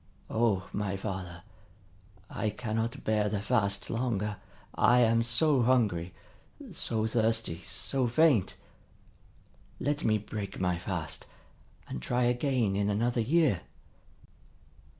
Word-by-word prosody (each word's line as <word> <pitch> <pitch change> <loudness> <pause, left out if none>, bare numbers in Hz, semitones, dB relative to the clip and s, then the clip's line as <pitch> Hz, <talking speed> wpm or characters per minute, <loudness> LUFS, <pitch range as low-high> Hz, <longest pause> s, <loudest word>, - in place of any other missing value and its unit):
O 110 -5 +1
my 100 -2 -2
father, 95 -4 -5 0.8
I 110 - -2
cannot 115 +1 -3
bear 105 -1 +1
the 105 -1 -1
fast 100 -2 0
longer! 105 -4 -1 0.4
I 120 - +4
am 115 0 +4
so 125 +4 +3
hungry, 105 -9 +2 0.6
so 110 -1 -1
thirsty, 110 -5 +1
so 130 +6 -1
faint! 135 - +3 1.2
Let 145 0 -1
me 110 -1 +3
break 105 -1 -6
my 90 -2 0
fast, 90 -4 -4 0.6
and 65 - -5
try 125 - 0
again 120 -4 +1
in 100 +1 +1
another 115 +4 +1
year." 140 - +2
110 Hz, 110 wpm, -30 LUFS, 100-120 Hz, 1.2 s, I